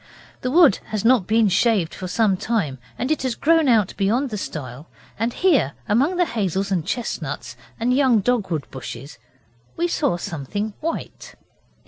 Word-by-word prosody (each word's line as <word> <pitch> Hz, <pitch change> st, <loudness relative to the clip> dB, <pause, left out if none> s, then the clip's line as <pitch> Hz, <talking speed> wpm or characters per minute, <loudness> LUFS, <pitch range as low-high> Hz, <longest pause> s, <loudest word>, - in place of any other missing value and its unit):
The 255 Hz, -, -1 dB
wood 310 Hz, -, +6 dB
has 215 Hz, 0 st, -3 dB
not 235 Hz, -6 st, +4 dB
been 220 Hz, 0 st, +3 dB
shaved 195 Hz, -3 st, +2 dB
for 185 Hz, -, -6 dB
some 205 Hz, +1 st, +2 dB
time, 180 Hz, -, -2 dB, 0.2 s
and 255 Hz, -, -2 dB
it 310 Hz, -, 0 dB
has 255 Hz, -3 st, -1 dB
grown 325 Hz, -1 st, +3 dB
out 220 Hz, -6 st, +3 dB
beyond 230 Hz, +7 st, +1 dB
the -, -, -3 dB
stile 140 Hz, -3 st, -7 dB, 0.3 s
and 230 Hz, +2 st, 0 dB
here, 285 Hz, -, +2 dB
among 270 Hz, -, +2 dB
the 355 Hz, -, +3 dB
hazels 195 Hz, -, -2 dB
and 180 Hz, -4 st, +1 dB
chestnuts 150 Hz, -, -4 dB, 0.2 s
and 240 Hz, +2 st, +1 dB
young 260 Hz, -5 st, +4 dB
dogwood 190 Hz, -, 0 dB
bushes, 130 Hz, 0 st, -8 dB, 0.6 s
we 345 Hz, -, +1 dB
saw 285 Hz, -, 0 dB
something 175 Hz, +7 st, -4 dB
white. 330 Hz, +1 st, -5 dB
215 Hz, 160 wpm, -22 LUFS, 175-255 Hz, 0.6 s, wood